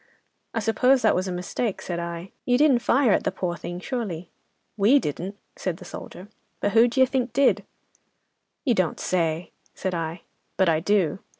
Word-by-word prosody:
"'"I 225 Hz, -, +1 dB
suppose 250 Hz, +4 st, +3 dB
that 220 Hz, -, +5 dB
was 185 Hz, +1 st, 0 dB
a -, -, -2 dB
mistake," 180 Hz, +5 st, -2 dB
said 175 Hz, -1 st, -4 dB
I, 170 Hz, +2 st, -5 dB
"you 245 Hz, 0 st, +3 dB
didn't 280 Hz, -3 st, +5 dB
fire 260 Hz, -1 st, +3 dB
at -, -, +3 dB
the -, -, 0 dB
poor 180 Hz, -2 st, -2 dB
thing, 175 Hz, +1 st, -6 dB
surely?" 185 Hz, -8 st, -4 dB, 0.4 s
"'"We 220 Hz, +7 st, +5 dB
didn't," 190 Hz, -, -3 dB, 0.2 s
said 180 Hz, -3 st, -3 dB
the -, -, -12 dB
soldier, 185 Hz, -, -9 dB, 0.3 s
"but 205 Hz, -, 0 dB
who 230 Hz, +3 st, +6 dB
d'ye 260 Hz, +2 st, +4 dB
think 255 Hz, -3 st, -1 dB
did?" 275 Hz, +2 st, +3 dB, 1.0 s
"'"You 250 Hz, -, +4 dB
don't 185 Hz, -6 st, 0 dB
say?" 165 Hz, -1 st, -1 dB, 0.2 s
said 190 Hz, -, -3 dB
I. 165 Hz, +1 st, -4 dB, 0.3 s
"'"But 190 Hz, -3 st, +4 dB
I 160 Hz, -1 st, +3 dB
do. 190 Hz, -2 st, +1 dB
195 Hz, 180 wpm, -25 LUFS, 175-240 Hz, 1.0 s, who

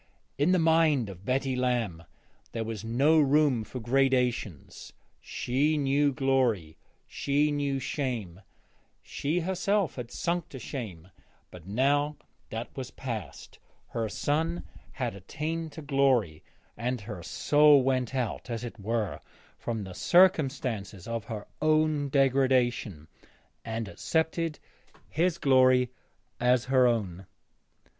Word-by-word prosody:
In 150 Hz, +5 st, +3 dB
the 185 Hz, -, +4 dB
mind 160 Hz, -, +3 dB
of 95 Hz, 0 st, -11 dB
Betty 130 Hz, 0 st, 0 dB
Lamb 120 Hz, -10 st, -1 dB, 0.5 s
there 115 Hz, -, -2 dB
was 110 Hz, -1 st, -5 dB
no 135 Hz, +8 st, +3 dB
room 145 Hz, -4 st, +3 dB
for 110 Hz, +4 st, -7 dB
gradations; 125 Hz, -, 0 dB, 0.3 s
she 145 Hz, +5 st, 0 dB
knew 145 Hz, 0 st, +2 dB
glory, 130 Hz, -, +1 dB, 0.3 s
she 145 Hz, +2 st, 0 dB
knew 140 Hz, -1 st, -1 dB
shame; 125 Hz, -, -3 dB, 0.6 s
she 160 Hz, +5 st, -2 dB
herself 190 Hz, 0 st, 0 dB
had 120 Hz, -2 st, -5 dB
sunk 170 Hz, +4 st, -2 dB
to 135 Hz, -, -8 dB
shame; 105 Hz, -, -7 dB, 0.4 s
but 90 Hz, -1 st, -12 dB
now 145 Hz, +7 st, +1 dB, 0.3 s
that 115 Hz, +1 st, -6 dB
was 130 Hz, -2 st, -5 dB
past, 115 Hz, -8 st, -7 dB, 0.3 s
her 115 Hz, -2 st, -2 dB
son 160 Hz, -, -1 dB, 0.3 s
had 125 Hz, -4 st, -3 dB
attained 155 Hz, -, -4 dB
to 160 Hz, -, -8 dB
glory, 130 Hz, -, +1 dB, 0.3 s
and 125 Hz, 0 st, -2 dB
her 100 Hz, -4 st, -7 dB
soul 145 Hz, -, +4 dB
went 130 Hz, -1 st, 0 dB
out, 125 Hz, -1 st, -3 dB
as 115 Hz, 0 st, -4 dB
it 120 Hz, -2 st, -7 dB
were, 110 Hz, -1 st, -2 dB, 0.4 s
from 115 Hz, -3 st, -3 dB
the 95 Hz, -1 st, -8 dB
circumstances 130 Hz, -, +2 dB
of 115 Hz, -2 st, -3 dB
her 110 Hz, -3 st, -6 dB, 0.2 s
own 155 Hz, -2 st, +2 dB
degradation 130 Hz, -, +1 dB, 0.6 s
and 115 Hz, -1 st, -4 dB
accepted 160 Hz, -, -1 dB, 0.5 s
his 170 Hz, +2 st, +1 dB
glory 130 Hz, -3 st, +4 dB, 0.5 s
as 125 Hz, 0 st, +3 dB
her 130 Hz, -1 st, +6 dB
own. 95 Hz, -6 st, -2 dB
130 Hz, 120 wpm, -28 LUFS, 115-145 Hz, 0.6 s, her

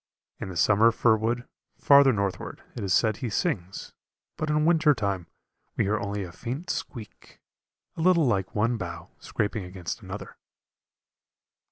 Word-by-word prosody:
In -, -, -5 dB
the 90 Hz, -, -6 dB
summer 110 Hz, +6 st, +5 dB
fir 115 Hz, 0 st, +3 dB
wood, 115 Hz, +3 st, -2 dB, 0.3 s
farther 140 Hz, -1 st, +6 dB
northward, 100 Hz, -4 st, -3 dB
it 115 Hz, -, -5 dB
is 95 Hz, -, -2 dB
said 110 Hz, +2 st, +3 dB
he 125 Hz, -3 st, -3 dB
sings, 105 Hz, -, -3 dB, 0.4 s
but 155 Hz, -, -3 dB
in 150 Hz, 0 st, +2 dB
winter 160 Hz, -3 st, +4 dB
time 100 Hz, -6 st, -2 dB, 0.5 s
we -, -, +3 dB
hear 105 Hz, +2 st, 0 dB
only 100 Hz, 0 st, -3 dB
a 90 Hz, -, -8 dB
faint 130 Hz, -, -5 dB
squeak, 110 Hz, -6 st, -8 dB, 0.6 s
a -, -, -5 dB
little 170 Hz, -2 st, +4 dB
like 100 Hz, -6 st, 0 dB
one 115 Hz, +3 st, +1 dB
bough 85 Hz, -5 st, -7 dB
scraping 105 Hz, -1 st, -2 dB
against 90 Hz, -2 st, -6 dB
another. -, -, -8 dB
110 Hz, 155 wpm, -26 LUFS, 100-135 Hz, 0.6 s, farther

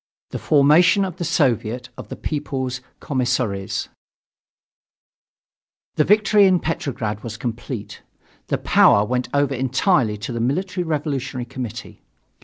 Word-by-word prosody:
THE -, -, -4 dB
FORMATION 155 Hz, +7 st, +4 dB
OF 185 Hz, -3 st, -6 dB
THE -, -, -3 dB
SOVIET 125 Hz, -6 st, 0 dB
OF -, -, -10 dB
THE -, -, -6 dB
PEOPLE'S 130 Hz, -4 st, -3 dB, 0.2 s
COMMISSARIES 120 Hz, -7 st, -1 dB, 2.0 s
The 150 Hz, -, +2 dB
victory 210 Hz, +1 st, +4 dB
in 185 Hz, -2 st, +3 dB
Petrograd 115 Hz, -10 st, -3 dB
was 110 Hz, -1 st, -6 dB
complete. 120 Hz, -2 st, -6 dB, 0.5 s
The -, -, 0 dB
power 100 Hz, +1 st, +4 dB
went 125 Hz, +2 st, -2 dB
over 140 Hz, -1 st, +1 dB
entirely 130 Hz, -, +1 dB
to 105 Hz, +3 st, -6 dB
the 115 Hz, -, -3 dB
Military 180 Hz, +9 st, -1 dB
Revolutionary 140 Hz, -5 st, -3 dB
Committee. 120 Hz, -2 st, -7 dB
130 Hz, 120 wpm, -21 LUFS, 120-155 Hz, 2.0 s, FORMATION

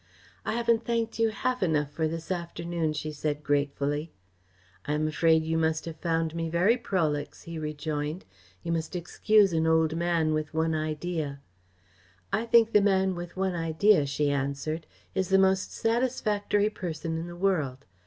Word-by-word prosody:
"I -, -, 0 dB
haven't 235 Hz, 0 st, +2 dB
thanked 230 Hz, -1 st, -1 dB
you 225 Hz, 0 st, +4 dB
half 250 Hz, +4 st, -2 dB
enough 150 Hz, -5 st, +1 dB
for 160 Hz, +1 st, 0 dB
this 165 Hz, +2 st, -5 dB
afternoon," 170 Hz, -2 st, -2 dB
she 155 Hz, +1 st, -4 dB
said 150 Hz, 0 st, -3 dB
gratefully. 145 Hz, +1 st, 0 dB, 0.7 s
"I 150 Hz, -, -1 dB
am 155 Hz, +1 st, +1 dB
afraid 160 Hz, +1 st, +3 dB
you 160 Hz, +1 st, 0 dB
must 160 Hz, 0 st, 0 dB
have 165 Hz, -1 st, -6 dB
found 165 Hz, -2 st, 0 dB
me 165 Hz, -1 st, -2 dB
very 180 Hz, +8 st, +3 dB
prolix," 160 Hz, -11 st, -2 dB
he 170 Hz, -1 st, -6 dB
rejoined. 150 Hz, +2 st, -3 dB, 0.4 s
"You 170 Hz, -, -3 dB
must 165 Hz, +1 st, -2 dB
excuse 195 Hz, +3 st, +3 dB
an 160 Hz, 0 st, +2 dB
old 160 Hz, -1 st, +3 dB
man 165 Hz, -2 st, +1 dB
with 155 Hz, 0 st, -3 dB
one 160 Hz, 0 st, +1 dB
idea." 155 Hz, -1 st, -2 dB, 0.9 s
"I 230 Hz, +3 st, 0 dB
think 230 Hz, -1 st, +5 dB
the 210 Hz, -, +5 dB
man 190 Hz, -1 st, +3 dB
with 175 Hz, +1 st, -7 dB
one 190 Hz, -1 st, 0 dB
idea," 165 Hz, 0 st, +3 dB
she 145 Hz, +1 st, 0 dB
answered, 140 Hz, +3 st, -2 dB, 0.3 s
"is 190 Hz, -2 st, -1 dB
the 195 Hz, -, +5 dB
most 190 Hz, 0 st, +3 dB
satisfactory 215 Hz, -3 st, +1 dB
person 165 Hz, -4 st, -4 dB
in 165 Hz, -, -5 dB
the 175 Hz, -, -8 dB
world. 155 Hz, -8 st, 0 dB
165 Hz, 165 wpm, -28 LUFS, 155-190 Hz, 0.9 s, think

